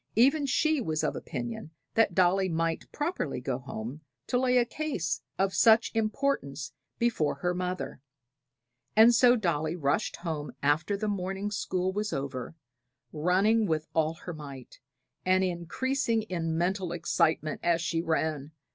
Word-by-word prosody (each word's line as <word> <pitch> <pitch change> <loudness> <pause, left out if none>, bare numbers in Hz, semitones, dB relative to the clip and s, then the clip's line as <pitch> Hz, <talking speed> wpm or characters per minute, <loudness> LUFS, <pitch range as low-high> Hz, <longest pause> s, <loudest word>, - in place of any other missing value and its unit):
Even 275 +6 +4
she 310 +2 +2
was 155 -7 -1
of - - 0
opinion 120 +2 -5 0.2
that 220 -6 +3
Dolly 185 +1 +3
might 165 0 -1
properly 295 - -2
go 125 0 -2
home 125 +2 -7 0.2
to 245 - +1
lay 250 -1 +3
a 245 - +4
case 240 - -2 0.2
of 195 0 +1
such 225 0 +5
importance 215 - -1 0.2
before 230 -11 +1
her 180 0 -1
mother; 180 -5 -4 0.9
and 225 +2 +8
so 245 +1 +6
Dolly 165 -7 0
rushed 150 +5 0
home 160 -4 -4
after 155 +7 +2
the 215 +1 -2
morning 195 0 -2
school 185 -2 -1
was 210 -1 -2
over, 135 0 -4 0.6
running 195 +8 +3
with 155 -2 0
all 160 0 +1
her 175 +2 -7
might, 140 -5 -10 0.4
and 185 +1 +3
increasing 225 +7 -1
in 165 -5 -2
mental 180 +1 0
excitement 165 -2 +1
as 170 -1 +2
she 165 -1 -1
ran. 155 -3 -1
180 Hz, 145 wpm, -29 LUFS, 155-220 Hz, 0.9 s, and